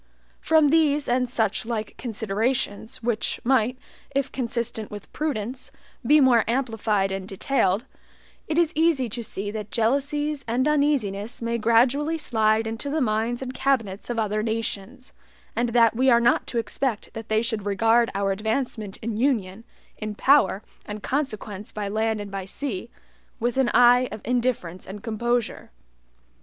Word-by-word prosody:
From 315 Hz, -2 st, +4 dB
these 300 Hz, -2 st, +3 dB
and 250 Hz, 0 st, +1 dB
such 220 Hz, -4 st, +1 dB
like 220 Hz, -2 st, -4 dB
considerations, 225 Hz, +1 st, -2 dB
which 230 Hz, -2 st, -1 dB
might, 250 Hz, -1 st, +2 dB, 0.4 s
if 275 Hz, 0 st, 0 dB
consistent 235 Hz, -3 st, -3 dB
with 205 Hz, -1 st, -10 dB
prudence, 260 Hz, -4 st, -3 dB, 0.3 s
be 305 Hz, +1 st, +5 dB
more 250 Hz, -5 st, +5 dB
amplified 225 Hz, -5 st, 0 dB
and 190 Hz, -1 st, -4 dB
detailed, 195 Hz, 0 st, +1 dB, 0.6 s
it 315 Hz, -, -1 dB
is 340 Hz, -1 st, +3 dB
easy 315 Hz, -5 st, +2 dB
to 235 Hz, +3 st, -4 dB
see 205 Hz, -1 st, -3 dB
that 210 Hz, -1 st, -6 dB
jealousies 280 Hz, +5 st, 0 dB
and 245 Hz, +3 st, +1 dB
uneasinesses 245 Hz, -8 st, 0 dB
may 235 Hz, 0 st, -1 dB
gradually 255 Hz, +8 st, +3 dB
slide 220 Hz, -6 st, +2 dB
into 225 Hz, +5 st, -4 dB
the 310 Hz, +3 st, 0 dB
minds 235 Hz, 0 st, 0 dB
and 255 Hz, 0 st, -5 dB
cabinets 230 Hz, -9 st, -1 dB
of 240 Hz, -, -2 dB
other 215 Hz, -1 st, 0 dB
nations, 225 Hz, +2 st, -4 dB, 0.4 s
and 240 Hz, +1 st, +1 dB
that 230 Hz, -1 st, +4 dB
we 260 Hz, +3 st, +3 dB
are 235 Hz, -1 st, +6 dB
not 240 Hz, +2 st, +2 dB
to 250 Hz, -, -4 dB
expect 230 Hz, 0 st, -2 dB
that 225 Hz, -1 st, -8 dB
they 220 Hz, +1 st, +2 dB
should 220 Hz, -4 st, -2 dB
regard 225 Hz, +4 st, +3 dB
our 195 Hz, 0 st, +1 dB
advancement 220 Hz, 0 st, -2 dB
in 220 Hz, -1 st, -3 dB
union, 225 Hz, -5 st, 0 dB, 0.4 s
in 215 Hz, -1 st, -4 dB
power 240 Hz, -6 st, +4 dB, 0.2 s
and 210 Hz, 0 st, -6 dB
consequence 215 Hz, -7 st, -3 dB
by 210 Hz, -1 st, -4 dB
land 220 Hz, +1 st, 0 dB
and 205 Hz, -1 st, -7 dB
by 195 Hz, -1 st, -4 dB
sea, 225 Hz, +2 st, -5 dB, 0.5 s
with 240 Hz, +1 st, 0 dB
an 265 Hz, -2 st, +2 dB
eye 245 Hz, +1 st, +6 dB
of 215 Hz, -, -7 dB
indifference 235 Hz, -8 st, -1 dB
and 200 Hz, +2 st, -8 dB
composure. 235 Hz, +1 st, -1 dB
230 Hz, 155 wpm, -24 LUFS, 215-260 Hz, 0.6 s, are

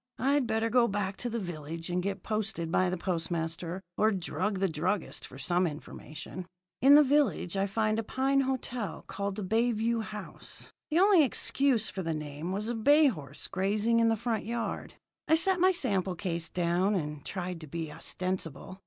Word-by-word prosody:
I'd 275 Hz, +1 st, +2 dB
better 225 Hz, +1 st, 0 dB
go 240 Hz, 0 st, +5 dB
back 200 Hz, -2 st, -2 dB
to 245 Hz, -, -3 dB
the 235 Hz, -, -2 dB
village 165 Hz, -3 st, -5 dB
and 180 Hz, +1 st, 0 dB
get 195 Hz, 0 st, -3 dB
posted 215 Hz, -6 st, -2 dB
by 185 Hz, +1 st, +3 dB
the 185 Hz, -, -2 dB
postmaster, 170 Hz, 0 st, -3 dB
or 215 Hz, +1 st, +4 dB
drug 195 Hz, +1 st, -2 dB
the 195 Hz, +1 st, +2 dB
druggist 175 Hz, +4 st, -2 dB
for 130 Hz, -, -12 dB
some 175 Hz, +7 st, +1 dB
information. 155 Hz, +3 st, -8 dB, 0.3 s
"In 275 Hz, +2 st, +8 dB
the 300 Hz, -, +8 dB
village 260 Hz, -, +1 dB
I 195 Hz, +1 st, +1 dB
found 215 Hz, +2 st, 0 dB
a -, -, -1 dB
pine 270 Hz, +4 st, +1 dB
hotel 255 Hz, -4 st, -3 dB
called 200 Hz, 0 st, -3 dB
the 210 Hz, -, -4 dB
Bay 225 Hz, +5 st, +2 dB
View 225 Hz, +1 st, 0 dB
House. 210 Hz, -2 st, -8 dB, 0.2 s
The 315 Hz, -, +1 dB
only 385 Hz, -1 st, +6 dB
excuse 265 Hz, -3 st, +2 dB
for 190 Hz, -, -4 dB
the 165 Hz, -2 st, -2 dB
name 150 Hz, +3 st, -5 dB
was 205 Hz, +3 st, -2 dB
a 240 Hz, -, -1 dB
bay 285 Hz, +6 st, +5 dB
horse 145 Hz, -, -7 dB
grazing 210 Hz, +5 st, +1 dB
in 230 Hz, 0 st, +4 dB
the 225 Hz, -, +1 dB
front 230 Hz, -1 st, -1 dB
yard. 230 Hz, +1 st, -4 dB, 0.3 s
I 320 Hz, -, +5 dB
set 365 Hz, +3 st, +3 dB
my 370 Hz, +2 st, +5 dB
sample 195 Hz, -, +1 dB
case 170 Hz, -3 st, -3 dB
down, 180 Hz, +3 st, +1 dB
and 150 Hz, -4 st, -3 dB
tried 180 Hz, -3 st, -4 dB
to 155 Hz, -, -8 dB
be 160 Hz, +1 st, -5 dB
ostensible. 185 Hz, +1 st, -3 dB
200 Hz, 190 wpm, -30 LUFS, 175-235 Hz, 0.3 s, In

